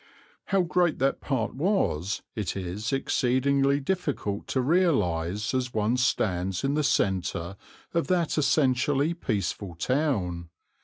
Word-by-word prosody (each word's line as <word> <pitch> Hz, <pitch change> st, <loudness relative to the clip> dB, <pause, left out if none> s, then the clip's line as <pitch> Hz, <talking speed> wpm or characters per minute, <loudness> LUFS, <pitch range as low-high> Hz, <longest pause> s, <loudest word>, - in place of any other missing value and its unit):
How 195 Hz, -2 st, +2 dB
great 175 Hz, 0 st, +1 dB
that 135 Hz, +1 st, 0 dB
part 130 Hz, -6 st, -1 dB
was 125 Hz, -, 0 dB
it 105 Hz, -2 st, -3 dB
is 95 Hz, +4 st, -4 dB
exceedingly 135 Hz, +1 st, +2 dB
difficult 145 Hz, -, -2 dB
to 130 Hz, -, -1 dB
realize 105 Hz, -, +1 dB
as 130 Hz, -2 st, -2 dB
one 110 Hz, +3 st, +2 dB
stands 95 Hz, -7 st, 0 dB
in 135 Hz, +1 st, +1 dB
the 150 Hz, -, +1 dB
centre 95 Hz, -6 st, 0 dB, 0.4 s
of 170 Hz, -1 st, 0 dB
that 175 Hz, -3 st, +1 dB
essentially 145 Hz, +1 st, +2 dB
peaceful 100 Hz, -, -3 dB
town. 90 Hz, -, -1 dB
130 Hz, 120 wpm, -27 LUFS, 95-145 Hz, 0.4 s, How